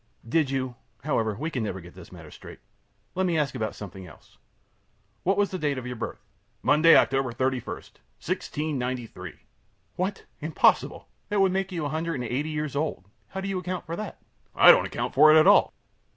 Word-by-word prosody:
Q. 115 - -15
Did 155 0 +2
you 130 -2 -2 0.3
However, 115 -7 0
we 155 +9 -4
can 130 - -2
never 100 -3 -3
get 90 -1 -13
this 90 -2 -13
matter 85 -4 -12
straight. - - -12 0.6
Let 190 +1 0
me 170 -2 +1
ask 145 -5 0
about 110 -5 -3
something 95 -2 -9
else. 80 - -18 0.8
What 195 +2 +1
was 205 -1 +1
the 185 - -4
date 145 -3 -1
of 130 - -5
your 125 0 -5
birth? 110 - -5
A. - - -33
Monday, 165 +2 +6
October 135 -2 +3
31, 130 +1 -1
1693. 125 - -5
Q. - - -28 0.6
What! 190 +2 -3
Impossible! 155 0 +1 0.2
That 205 -2 0
would 190 -1 +4
make 195 0 -1
you 165 -4 -3
a - - -2
hundred 165 +2 -2
and 125 - -3
eighty 130 +6 -2
years 150 -2 -3
old. 140 - -3 0.2
How 190 - -6
do 195 - -4
you 195 -1 -2
account 180 0 -5
for 165 - -4
that? 210 0 -6 0.4
A. - - -1
I - - +12
don't - - +3
account - - -4
for 155 +3 +7
it 155 - +8
at 155 - +5
all. - - +6
145 Hz, 210 wpm, -26 LUFS, 120-165 Hz, 0.8 s, I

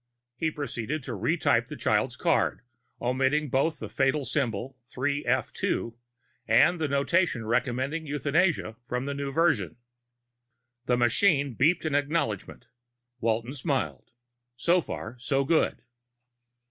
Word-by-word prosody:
_ - - -55 0.3
He 160 +5 0
proceeded 145 -1 -4
to 125 - -6
retype 120 - +1
the - - -7
child's - - +1
card, - - +1 0.4
omitting 135 +4 +1
both 140 +5 +1
the 110 - -6
fatal 135 +7 +1
symbol 130 -2 -2
3f2 130 -3 -1 0.5
and 160 +10 +4
the 155 - +1
notation 140 -2 +1
recommending 130 +7 -1
euthanasia 145 -3 +1
from 125 +1 -2
the 140 - -2
new 140 0 -3
version. 140 - +1 1.1
The 125 - +3
machine 140 - +3
beeped 160 +7 +2
an 155 - -1
acknowledgement. 145 - -1 0.5
Walton 115 +3 -1
smiled. 130 - -2 0.5
So 170 +8 +3
far, 120 -5 -7
so 135 +3 0
good. 160 +3 +1
135 Hz, 120 wpm, -27 LUFS, 120-150 Hz, 1.1 s, and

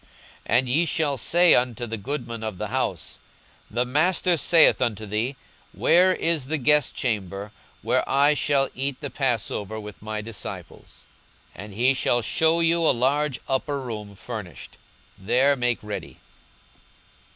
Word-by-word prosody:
42:022:011 - - +4
And 130 0 +1
ye 155 +7 +3
shall 150 -3 0
say 175 +7 +5
unto 125 -1 +1
the 115 -1 -5
goodman 115 0 -5
of 110 -4 -5
the 105 +1 -5
house, 110 -9 -3 0.5
The 120 +3 -1
Master 175 +7 +2
saith 165 -1 +4
unto 110 -3 -1
thee, 110 +6 -2 0.4
Where 185 +2 +4
is 165 -6 0
the 160 +2 -1
guestchamber, 110 -8 0 0.3
where - - +1
I 140 +2 +4
shall 140 -2 +1
eat 135 0 -3
the 145 -3 -6
passover 110 -5 -2
with 105 -1 -10
my 110 0 -5
disciples? 110 -1 -9 0.5
42:022:012 95 - -8
And 105 - -12
he 125 +5 +3
shall 120 -2 +1
shew 160 +6 +2
you 165 +1 +2
a 165 - +3
large 135 +2 0
upper 140 +2 -1
room 105 -5 -7
furnished: 105 -5 -9 0.4
there 130 +8 +2
make 120 -2 0
ready. 105 -1 -7
125 Hz, 150 wpm, -24 LUFS, 110-145 Hz, 0.5 s, say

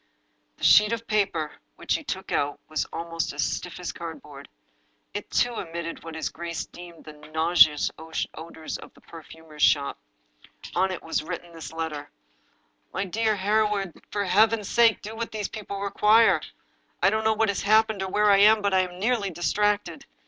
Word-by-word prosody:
The - - -15
sheet 210 +1 +7
of 230 0 -4
paper 195 -8 0 0.2
which - - -2
he - - -1
took - - -5
out 145 0 0
was 155 - -1
almost 165 0 -3
as - - -1
stiff - - -4
as - - -4
cardboard. - - -9 0.6
It, - - -5
too, 245 -2 +1
emitted 170 0 -6
what 165 -1 -8
his 160 - -2
grace 170 -1 -5
deemed 175 -1 -12
the 155 - -10
nauseous 155 0 +3 0.4
odors 160 -1 -7
of - - -12
the - - -20
perfumer's 160 -1 -12
shop. 140 -2 +3 0.7
On 185 +2 +2
it 185 - -5
was 165 - -1
written 175 +1 -7
this 165 -1 -8
letter: 160 -3 -5 0.8
"My - - -2
dear 220 +3 0
Hereward— 205 -2 +1 0.2
For 205 -1 -2
Heaven's 215 +2 +3
sake 230 -2 +4
do 215 +2 -7
what 230 +1 -4
these 210 -3 -3
people 200 -2 -6
require 210 +3 +4 0.6
I - - +1
I - - +7
don't 220 +1 0
know 220 0 +3
what 220 0 +2
has 200 - -1
happened 215 0 +3
or 190 - -2
where 210 +1 +3
I 200 - +6
am, 210 +1 +6
but 200 -1 +1
I 190 - +5
am 180 -1 -2
nearly 215 -1 +1
distracted! 205 +5 -1
190 Hz, 180 wpm, -26 LUFS, 165-210 Hz, 0.8 s, sheet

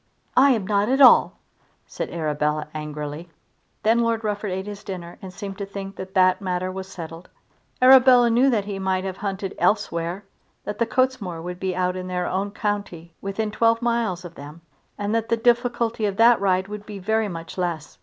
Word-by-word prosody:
"I 270 +3 +6
am 215 -5 -2
not 205 +2 +1
at 265 +2 +2
all," 265 - +7 0.5
said - - -5
Arabella, 150 -2 -1
angrily. 150 +1 -6 0.5
Then 225 +2 +3
Lord 230 -1 0
Rufford 210 -1 -2
ate 190 +1 -3
his 205 -1 -8
dinner 175 -3 -7
and 190 - -8
seemed 195 +1 -7
to 200 - -3
think 195 0 -7
that 190 0 -8
that 185 +1 +4
matter 185 -1 -2
was 190 0 -6
settled. 165 -2 -9 0.5
Arabella 255 -2 +7
knew 250 +4 +4
that 215 -6 +1
he 200 -1 -5
might 190 -1 0
have 190 -1 -5
hunted 195 -1 -4
elsewhere, 180 -2 0 0.4
that 210 0 -6
the 235 - +1
Cottesmore 235 -11 -1
would 180 +1 -6
be 190 -1 -2
out 180 0 0
in 185 0 -5
their 180 -1 -2
own 195 +3 -1
county 200 -5 -4
within 210 +2 -3
twelve 230 +1 +2
miles 230 -7 -1
of 170 - -9
them, 150 +2 -11 0.4
and 205 +1 -2
that 225 0 -1
the 230 - +2
difficulty 235 -2 +1
of 200 -1 -4
that 230 -1 +5
ride 190 -1 +1
would 210 0 -8
be 210 -2 -7
very 220 +3 0
much 165 -3 -7
less. 170 -4 -4
195 Hz, 195 wpm, -23 LUFS, 180-220 Hz, 0.5 s, all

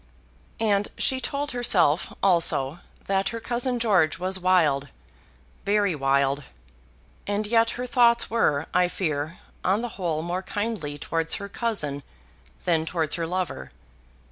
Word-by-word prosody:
And 205 -2 +2
she 260 0 +2
told 290 +2 -3
herself, 185 -10 +2
also, 170 -5 +2 0.3
that 195 0 +1
her 230 - -5
cousin 245 +2 -1
George 195 -10 +2
was 190 +1 -2
wild, 160 -7 +3 0.8
very 205 -2 +2
wild. 140 0 +1 0.8
And 205 +1 -1
yet 230 +1 +3
her 250 - -3
thoughts 235 -2 +4
were, 160 -10 +1
I 180 0 +4
fear, 155 -3 -3 0.3
on 195 +5 +1
the 240 - -3
whole 165 -7 -2
more 175 +2 -2
kindly 205 -7 -3
towards 165 +2 0
her 200 - -5
cousin 200 -10 -2 0.6
than 165 -3 +2
towards 160 -2 -1
her 165 -1 -1
lover. 175 - -3
185 Hz, 135 wpm, -25 LUFS, 155-225 Hz, 0.8 s, thoughts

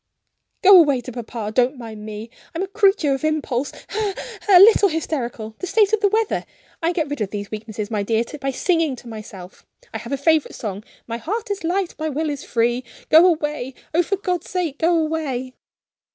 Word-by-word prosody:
"Go 385 -1 +10
away 285 -6 +4
to 255 - -8
papa! 230 -3 -5
Don't 255 +3 +2
mind 220 -3 -9
me 215 +2 -7 0.2
I'm 340 - -1
a - - -3
creature 390 -7 +3
of 270 - -4
impulse 290 -4 -1
ha! - - -15
ha! 420 -1 -1 0.3
ha! 395 -3 +6
a - - +9
little 405 0 +7
hysterical 245 -9 -3
the 370 - -4
state 420 +1 +3
of 440 - +4
the 410 - +3
weather 440 +1 0 0.4
I 330 +1 +1
get 320 -4 -1
rid 290 -4 -5
of 205 - -1
these 205 -1 -6
weaknesses, 215 0 -5
my 210 -2 0
dear, 225 +3 +1 0.2
by 270 0 -2
singing 320 +1 +1
to 245 - -13
myself. 205 -5 -10 0.3
I 225 - -3
have 235 +4 -9
a 275 - 0
favorite 315 +2 +2
song: 205 -2 -5 0.2
'My 230 0 -4
heart 415 - -4
is 400 - -3
light, 360 +2 -1
my 315 0 -1
will 305 +1 -1
is 285 - -5
free.' 240 +2 0 0.3
Go 325 +3 +8
away! 300 -6 -1 0.2
oh, 340 - +4
for 375 +3 -1
God's 360 -3 -3
sake, 340 -6 -2
go 335 +1 +3
away!" 300 -6 -2
295 Hz, 210 wpm, -21 LUFS, 235-355 Hz, 0.4 s, Go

